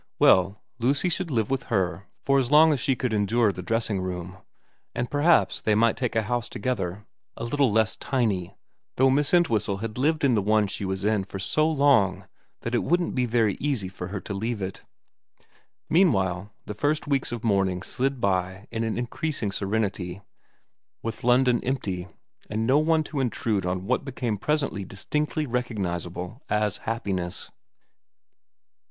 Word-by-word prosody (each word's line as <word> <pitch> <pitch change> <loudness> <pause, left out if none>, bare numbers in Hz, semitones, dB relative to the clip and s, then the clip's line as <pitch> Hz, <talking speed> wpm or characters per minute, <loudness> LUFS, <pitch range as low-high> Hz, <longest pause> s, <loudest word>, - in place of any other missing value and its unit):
Well, 95 +3 +4 0.2
Lucy 140 +9 +2
should 175 0 -2
live 115 -4 0
with 135 -1 -1
her 95 -4 -1 0.2
for 140 0 +3
as 125 -3 0
long 155 +2 +7
as 140 - -1
she 135 +1 +1
could 125 -2 -2
endure 105 +1 +2
the 90 - -7
dressing 110 0 -1
room, 90 0 -5 0.6
and 120 0 -2
perhaps 155 +3 +3
they 105 - +2
might 115 +1 +3
take 125 -4 -2
a 110 - +2
house 120 +2 -2
together 105 -4 -3 0.3
a - - -5
little 135 +1 +2
less 110 0 +2
tiny, 100 -8 -1 0.4
though 130 +1 +5
Miss 145 +2 +2
Entwhistle 110 - +2
had 110 +3 -5
lived 155 +3 +1
in 135 -3 +4
the 105 - +3
one 105 +1 +3
she 100 0 -4
was 95 +1 -2
in 105 -2 +2
for 95 - -7
so 155 +11 +1
long 140 - +3 0.4
that 115 - -4
it 120 - +2
wouldn't 175 0 +1
be 125 -1 +1
very 115 -3 +2
easy 130 -10 -1
for 90 -1 -7
her 100 +2 -4
to 100 - -5
leave 110 +3 -2
it. 95 -1 -5 1.1
Meanwhile 100 - +2
the 105 - -5
first 145 +9 0
weeks 140 -4 0
of 120 -2 -5
mourning 95 -4 +1
slid 135 +4 -1
by 95 -1 -1
in 115 -1 -2
an 110 0 -2
increasing 120 -2 -2
serenity, 100 -3 -2 0.8
with 115 0 -4
London 125 0 +3
empty 95 -9 -2 0.4
and 110 +2 -1
no 135 +5 +4
one 160 0 +2
to 150 -1 -4
intrude 110 -6 0
on 90 +1 -2
what 125 +6 0
became 125 -6 -3
presently 140 -7 -1
distinctly 150 - -2
re 125 -2 0
cognisable 90 -3 -4
as 105 -1 +1
happiness. 95 -6 -3
115 Hz, 170 wpm, -26 LUFS, 95-135 Hz, 1.1 s, long